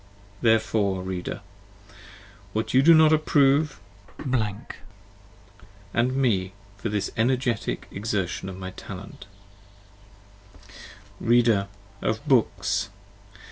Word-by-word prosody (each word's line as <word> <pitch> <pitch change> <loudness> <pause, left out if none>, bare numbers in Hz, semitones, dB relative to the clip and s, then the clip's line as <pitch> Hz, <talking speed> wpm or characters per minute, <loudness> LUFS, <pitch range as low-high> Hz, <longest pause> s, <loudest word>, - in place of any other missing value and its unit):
Therefore... 110 -4 +2
Reader,... 95 -1 -4 1.1
what 110 0 -2
you 130 - +6
do 165 +4 +7
not 155 0 +6
approve, 145 -3 +3 0.3
& 95 - -13 1.7
me 120 -7 +1 0.2
for 105 +3 -3
this 105 -1 -2
energetic 120 0 0
exertion 100 -3 -3
of 95 - -8
my 95 0 -6
talent, 100 +1 -10 1.9
Reader!... 115 -4 +3 0.3
of 110 +6 -2
books! 130 -6 +1
110 Hz, 85 wpm, -25 LUFS, 100-130 Hz, 1.9 s, do